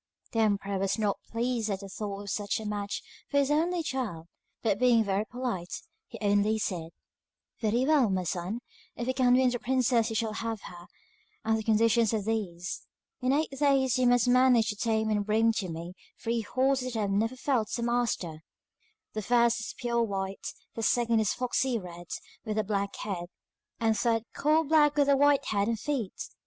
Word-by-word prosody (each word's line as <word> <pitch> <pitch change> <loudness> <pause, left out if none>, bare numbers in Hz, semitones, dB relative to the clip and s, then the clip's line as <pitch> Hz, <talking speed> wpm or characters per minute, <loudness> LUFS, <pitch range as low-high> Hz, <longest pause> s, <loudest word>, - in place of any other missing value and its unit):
The 225 - -1
emperor 200 -2 +1
was 195 +2 0
not 210 -2 0
much - - -27
pleased 230 -1 -1
at 195 -1 -2
the 200 - -7
thought 200 +1 -5
of 200 - -7
such 205 +1 -1
a 220 - -7
match 205 -1 -3 0.3
for 285 - 0
his 280 0 +3
only 335 +3 +1
child, 240 - -3 0.4
but 210 -3 +1
being 245 -3 +5
very 200 +1 0
polite, 240 -8 -4 0.2
he 230 - -9
only 205 +1 +2
said: 175 -6 -3 0.7
'Very 235 +3 +1
well, 285 -6 +4
my 190 -1 0
son, 180 +6 -3 0.3
if 235 - -4
you 260 - +1
can 250 -1 +4
win 255 -1 +4
the 245 - -2
princess 245 -3 +2
you 225 - -4
shall 220 -1 0
have 225 -1 -3
her, 175 0 -11 0.6
and 220 0 +3
the 220 - -2
conditions 225 +1 +3
are 215 - 0
these. 195 -5 -3 0.3
In 255 +1 +2
eight 300 +2 +1
days 270 -2 +2
you 250 - +4
must 245 0 +4
manage 250 -2 +5
to 210 - -2
tame 220 0 0
and 210 -1 +1
bring 220 +2 +3
to 190 -5 -2
me 170 +2 -6 0.3
three 230 0 -1
horses 255 +2 0
that 225 - -2
have 200 -1 0
never 225 +5 +1
felt 250 -5 0
a 235 - -3
master. 235 -10 -1 0.7
The 215 - -2
first 235 +2 +3
is 225 - -6
pure 235 -1 0
white, 195 -3 -3 0.3
the 225 - -5
second 230 0 +2
a 220 - +1
foxy 250 +3 0
red 175 -3 -9 0.4
with 215 -2 -3
a 215 - +2
black 200 -1 -2
head, 175 -4 -4 0.5
the 225 -1 +3
third 225 +1 +1
coal 310 +2 +3
black 295 -1 +4
with 285 -1 +3
a 280 - +6
white 285 0 +4
head 200 -1 0
and 230 -2 -1
feet. 250 -7 -3
225 Hz, 195 wpm, -29 LUFS, 205-250 Hz, 0.7 s, a